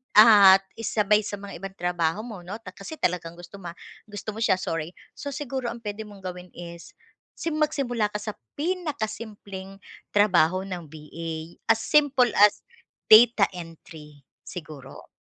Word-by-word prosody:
at 200 -3 +9 0.2
isabay 210 -1 +2
sa 205 -1 -4
mga 200 -3 -9
ibang 195 0 -8
trabaho 175 +2 -1
mo 220 -6 -8
'no, 200 - -5
ta 185 - -9
kasi 195 +12 -9
talagang 170 - -2
gusto 175 +3 -12
mo 170 -2 -8 0.3
gusto 210 +1 -6
mo 220 - -8
siya, 220 -4 +3
sorry. 165 -2 -4 0.2
So, 285 -2 -5
siguro 265 -4 -4
ang 235 0 -6
puwede 210 +1 -5
mong 200 -2 -14
gawin 180 0 -7
is 170 0 -10 0.4
sim 315 -2 -3
magsimula 250 -8 0
ka 210 - -19
sa 210 +1 -3 0.2
pinakasimpleng 220 - -4 0.4
trabaho 185 -3 +4
ng 180 -4 -6
VA 160 +2 -8
as 225 0 +3
simple 280 -6 +3
as 205 0 +4 0.5
data 225 -1 +8
entry 160 -4 -11 0.2
siguro. 155 -6 -10
200 Hz, 150 wpm, -25 LUFS, 175-225 Hz, 0.5 s, at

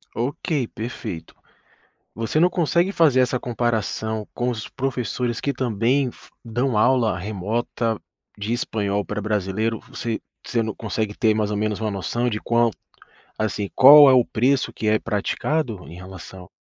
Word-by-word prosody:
Ok, 130 - -1
perfeito. 110 -7 -6 0.8
Você 115 +7 -1
não 175 - +6
consegue 175 +2 +1
fazer 150 -8 +4
essa 125 0 +1
comparação 110 -2 -2
com 125 +1 0
os 110 -2 -5
professores 125 -2 -2
que 140 - 0
também 125 +1 0
fo - - -19
dão 120 +1 0
aula 120 -3 +3
remota 110 +3 -2 0.4
de 105 +3 -2
espanhol 105 -4 -1
para 105 0 -4
brasileiro? 105 +2 -1
V - - -21
você 115 -2 -4 0.2
você 115 -2 0
não 110 -2 -3
consegue 110 -1 -3
ter 110 -2 +3
mais 105 -1 0
ou 105 - -1
menos 105 0 -1
uma 110 -1 -1
noção 115 +5 -1
de 105 -1 -3
quão 115 0 +2 0.7
assim, 105 -2 -1
qual 145 +1 +9
é - - +6
o 125 -2 +5
preço 130 +4 +1
que 110 - -6
é 110 0 +3
praticado 115 - -2
em 85 - -10
relação 95 0 -11
115 Hz, 160 wpm, -23 LUFS, 105-125 Hz, 0.8 s, qual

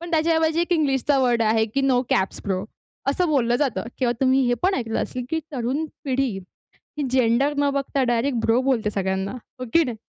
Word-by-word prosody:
पण 345 0 -7
त्याच्याऐवजी 320 0 +2
एक 345 +1 0
इंग्लिशचा 280 -3 +2
वर्ड 245 -3 +2
आहे 220 0 +3
की 275 - +2
नो 265 -2 +3
कॅप्स 190 - 0
ब्रो 190 -1 -1 0.5
असं 350 +4 0
बोललं 240 -5 +2
जातं 275 -4 -1 0.2
किंवा 245 -2 +2
तुम्ही 265 0 +4
हे 245 - +2
पण 380 +2 +3
ऐकलं 225 -6 -2
असेल 250 -1 -5
की 320 - 0
तरुण 265 +4 -1 0.2
पिढी 270 -1 +1 0.7
ही 295 - -1
जेंडर 255 +3 +2
न 285 0 +2
बघता 275 -1 0
डायरेक्ट 240 +2 0
ब्रो 230 +3 +3
बोलते 255 -5 +1
सगळ्यांना. 190 0 -2
हो 255 +1 -9
की 335 - +6
नाही. 245 -6 -4
260 Hz, 195 wpm, -23 LUFS, 235-290 Hz, 0.7 s, की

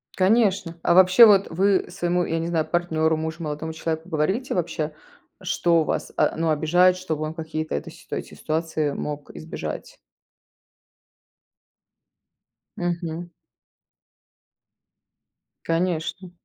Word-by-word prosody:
Конечно. 190 -4 +2
А - - +4
вообще, 185 +5 +8
вот 200 -3 +5
вы 190 +3 +2
своему, 175 -1 0
я 165 - -1
не 165 - -2
знаю, 165 -2 0
партнеру, 160 -2 +1
мужу, 160 +1 -4
молодому 155 +1 -4
человеку, 160 +2 -4
говорите 190 +11 -1
вообще, 160 -3 -2 0.5
что 170 -2 +2
вас, - - -3
а, - - +2
ну, 165 0 0
обижает, 175 +4 +4
чтобы 160 -4 -3
он 155 +1 -3
какие-то 160 -1 -4
это 70 - -4
сит - - -18
эти - - -5
ситуации 155 -1 -1
мог 145 0 -5
избежать? 160 +1 -7 2.8
Мгм. 175 -1 -3 2.4
Конечно. 175 +1 -2
165 Hz, 115 wpm, -24 LUFS, 160-180 Hz, 2.8 s, вообще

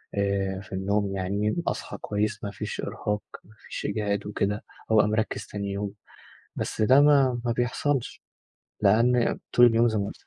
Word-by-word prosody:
آآ 100 -1 0
في 95 - -17
النوم 100 +1 0
يعني، 100 +3 -1
أصحى - - -3
كويس، 105 +1 -2
ما 100 - -3
فيش - - -5
إرهاق، 105 0 -3 0.2
ما 110 - -20
فيش - - -7
إجهاد 100 -1 -1
وكده، 105 0 -1 0.3
وأبقى 110 -1 +5
مركّز 105 -1 -1
تاني 100 -1 -4
يوم، 100 0 -3 0.6
بس - - -2
ده 130 +5 +6
ما 135 -4 +4
ما 120 - +1
بيحصلش 120 +2 -1 0.6
لأن 115 +4 +3
طول 120 - +7
اليوم 115 0 +4
زي 110 -2 0
ما 100 - -1
قُلت - - -9
لك. - - -31
105 Hz, 170 wpm, -26 LUFS, 100-115 Hz, 0.6 s, طول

